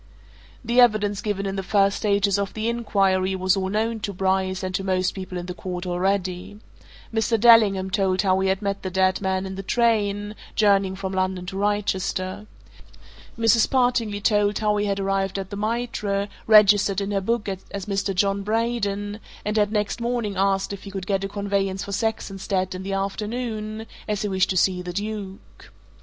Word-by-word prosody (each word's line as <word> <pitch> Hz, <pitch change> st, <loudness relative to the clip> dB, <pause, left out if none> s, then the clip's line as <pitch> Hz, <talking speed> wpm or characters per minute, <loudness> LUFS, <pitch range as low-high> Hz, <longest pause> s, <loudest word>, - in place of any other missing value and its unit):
The 240 Hz, +2 st, +4 dB
evidence 210 Hz, -4 st, +3 dB
given 205 Hz, -3 st, -2 dB
in 195 Hz, 0 st, -3 dB
the -, -, -1 dB
first 195 Hz, +1 st, +2 dB
stages 200 Hz, -1 st, +2 dB
of 200 Hz, -1 st, -3 dB
the 220 Hz, +1 st, -2 dB
inquiry 195 Hz, -5 st, +1 dB
was 185 Hz, +1 st, +2 dB
all 190 Hz, -1 st, -1 dB
known 220 Hz, +2 st, -1 dB
to 205 Hz, -, -3 dB
Bryce, 190 Hz, 0 st, 0 dB
and 185 Hz, 0 st, -3 dB
to 195 Hz, -, -1 dB
most 185 Hz, -1 st, +1 dB
people 185 Hz, -1 st, -6 dB
in 175 Hz, -, -5 dB
the 180 Hz, -, -5 dB
court, 180 Hz, 0 st, -5 dB
already. 185 Hz, +2 st, -2 dB, 0.5 s
Mr. 225 Hz, 0 st, +1 dB
Dellingham 205 Hz, -5 st, +5 dB
told 190 Hz, 0 st, +1 dB
how 190 Hz, -1 st, +3 dB
he 190 Hz, 0 st, +1 dB
had 190 Hz, +2 st, -1 dB
met 200 Hz, 0 st, -2 dB
the 190 Hz, -, -3 dB
dead 185 Hz, +1 st, +1 dB
man 190 Hz, 0 st, -1 dB
in 190 Hz, -, -5 dB
the 190 Hz, -, -5 dB
train, 205 Hz, -2 st, +1 dB, 0.2 s
journeying 200 Hz, -3 st, +3 dB
from 190 Hz, 0 st, -4 dB
London 185 Hz, -1 st, -1 dB
to 185 Hz, -, -6 dB
Wrychester. 195 Hz, -1 st, -1 dB, 0.9 s
Mrs. 225 Hz, 0 st, +4 dB
Partingley 245 Hz, -5 st, +1 dB
told 205 Hz, -1 st, +2 dB
how 210 Hz, -1 st, +1 dB
he 205 Hz, 0 st, 0 dB
had 200 Hz, 0 st, -1 dB
arrived 195 Hz, 0 st, -1 dB
at 195 Hz, 0 st, -5 dB
the -, -, -4 dB
Mitre, 210 Hz, -2 st, -2 dB, 0.2 s
registered 205 Hz, -2 st, +6 dB
in 200 Hz, 0 st, -3 dB
her 200 Hz, -1 st, 0 dB
book 230 Hz, +2 st, -1 dB, 0.2 s
as 200 Hz, -2 st, -5 dB
Mr. 195 Hz, -1 st, -1 dB
John 200 Hz, +1 st, +1 dB
Braden, 210 Hz, -1 st, -1 dB, 0.3 s
and 210 Hz, +1 st, -1 dB
had 210 Hz, -1 st, +2 dB
next 210 Hz, +1 st, -1 dB
morning 235 Hz, -4 st, -1 dB
asked 195 Hz, +1 st, +1 dB
if 200 Hz, -, -7 dB
he 200 Hz, -, -9 dB
could 195 Hz, -1 st, -5 dB
get 195 Hz, -1 st, 0 dB
a 195 Hz, -, -3 dB
conveyance 195 Hz, -1 st, -1 dB
for 200 Hz, -, -7 dB
Saxonsteade 195 Hz, -3 st, -2 dB
in 185 Hz, -, -6 dB
the 195 Hz, +1 st, -4 dB
afternoon, 215 Hz, +2 st, -3 dB, 0.2 s
as 210 Hz, -1 st, -1 dB
he -, -, 0 dB
wished 190 Hz, -1 st, +1 dB
to 185 Hz, -, 0 dB
see 180 Hz, 0 st, +2 dB
the 180 Hz, 0 st, -6 dB
Duke. 200 Hz, -1 st, -6 dB
200 Hz, 190 wpm, -24 LUFS, 190-210 Hz, 0.9 s, registered